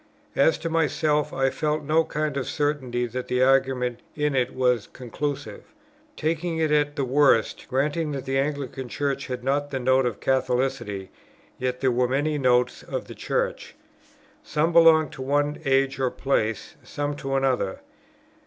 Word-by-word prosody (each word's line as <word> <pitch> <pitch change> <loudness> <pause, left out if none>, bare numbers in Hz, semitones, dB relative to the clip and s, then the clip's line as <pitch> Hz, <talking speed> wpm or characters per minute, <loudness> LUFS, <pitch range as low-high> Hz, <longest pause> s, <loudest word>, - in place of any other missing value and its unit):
As 150 +3 +4
to 165 - -4
myself, 155 -2 +1
I 135 0 +1
felt 150 +1 -1
no 155 +3 +3
kind 150 -2 -2
of 135 -2 -2
certainty 135 -5 -1
that 125 +2 -5
the 125 0 +2
argument 130 -2 +2 0.2
in 150 -2 0
it 125 -2 +1
was 125 -4 +1
conclusive. 140 +3 -5 0.6
Taking 165 +1 -1
it 160 -2 +1
at 145 -1 +2
the 140 - -1
worst, 135 -3 +2
granting 150 +4 0
that 135 -2 -5
the 135 0 0
Anglican 135 -2 -3
Church 140 +1 -2
had 125 -2 -5
not 145 +2 0
the 135 - -3
Note 130 0 +3
of 115 - -4
Catholicity; 130 -6 -1 0.5
yet 125 0 -2
there 130 -1 +3
were 125 +1 +2
many 145 +4 0
Notes 125 -2 +2
of - - -5
the - - -9
Church. - - -3 0.7
Some 160 +3 0
belonged 160 -3 +6
to - - -9
one 145 +2 0
age 135 0 +2
or 130 -1 +2
place, 115 -5 -1
some 145 0 -3
to 135 -1 -3
another. 130 -7 0
135 Hz, 165 wpm, -25 LUFS, 125-150 Hz, 0.7 s, belonged